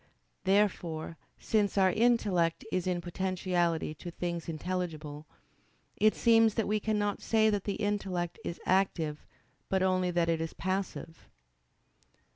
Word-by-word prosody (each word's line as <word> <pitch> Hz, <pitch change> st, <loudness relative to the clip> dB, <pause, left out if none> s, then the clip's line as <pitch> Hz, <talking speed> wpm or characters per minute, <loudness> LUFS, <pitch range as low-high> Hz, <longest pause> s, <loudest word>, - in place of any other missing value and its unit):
Therefore, 180 Hz, -5 st, +1 dB, 0.2 s
since 205 Hz, -2 st, 0 dB
our 190 Hz, -1 st, +5 dB
intellect 205 Hz, -7 st, +2 dB
is 185 Hz, 0 st, -1 dB
in 180 Hz, -1 st, 0 dB
potentiality 175 Hz, -2 st, -1 dB
to 175 Hz, +3 st, -8 dB
things 170 Hz, -1 st, -4 dB
intelligible, 155 Hz, -3 st, -4 dB, 0.7 s
it 215 Hz, +1 st, +3 dB
seems 225 Hz, -2 st, +4 dB
that 225 Hz, -, 0 dB
we 210 Hz, +1 st, +1 dB
cannot 205 Hz, -1 st, -1 dB
say 220 Hz, -1 st, +3 dB
that 205 Hz, -2 st, -1 dB
the 200 Hz, -, -1 dB
intellect 190 Hz, -4 st, -2 dB
is 170 Hz, -, -5 dB
active, 165 Hz, -5 st, +1 dB, 0.5 s
but 190 Hz, -1 st, +2 dB
only 185 Hz, -1 st, +2 dB
that 175 Hz, -1 st, +1 dB
it 165 Hz, -1 st, +1 dB
is 165 Hz, -, -4 dB
passive. 185 Hz, -3 st, -4 dB
185 Hz, 130 wpm, -30 LUFS, 170-205 Hz, 0.7 s, our